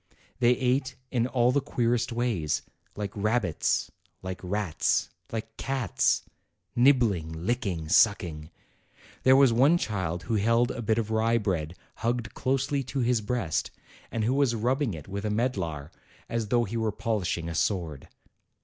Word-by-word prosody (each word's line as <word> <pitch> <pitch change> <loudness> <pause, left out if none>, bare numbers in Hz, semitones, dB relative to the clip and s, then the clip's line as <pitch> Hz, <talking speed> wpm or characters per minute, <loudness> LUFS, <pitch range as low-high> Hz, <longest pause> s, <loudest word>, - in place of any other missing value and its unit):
They 120 -1 +5
ate 130 +1 0 0.2
in 120 -2 +1
all 125 -1 +3
the 140 +2 +2
queerest 120 -2 0
ways, 115 -11 -1 0.3
like 105 -2 -4
rabbits, 105 -5 0 0.3
like 95 0 -5
rats, 95 -3 0 0.2
like 115 0 -5
cats, 135 -8 +1 0.5
nibbling, 120 - +3
licking, 95 -9 -1
sucking. 80 -5 +2 0.7
There 130 0 +6
was 135 -3 +6
one 140 +8 +5
child 90 - -2
who 110 +3 0
held 115 +4 +3
a 120 - -5
bit 110 0 +1
of 110 -1 -1
rye 115 +1 +2
bread 90 -6 -2 0.2
hugged 120 0 -2
closely 135 +2 0
to 135 +1 -2
his 120 -1 +2
breast, 105 -7 -1 0.4
and 115 - -2
who 120 +4 +2
was 135 -4 +2
rubbing 125 - 0
it 75 - -10
with 100 +1 -5
a 105 - -1
medlar, 95 - -2 0.4
as 115 -2 -2
though 120 +2 +2
he 115 +1 -3
were 110 -1 0
polishing 100 -6 -2
a 85 - -4
sword. 80 -6 -1
115 Hz, 150 wpm, -27 LUFS, 95-125 Hz, 0.7 s, There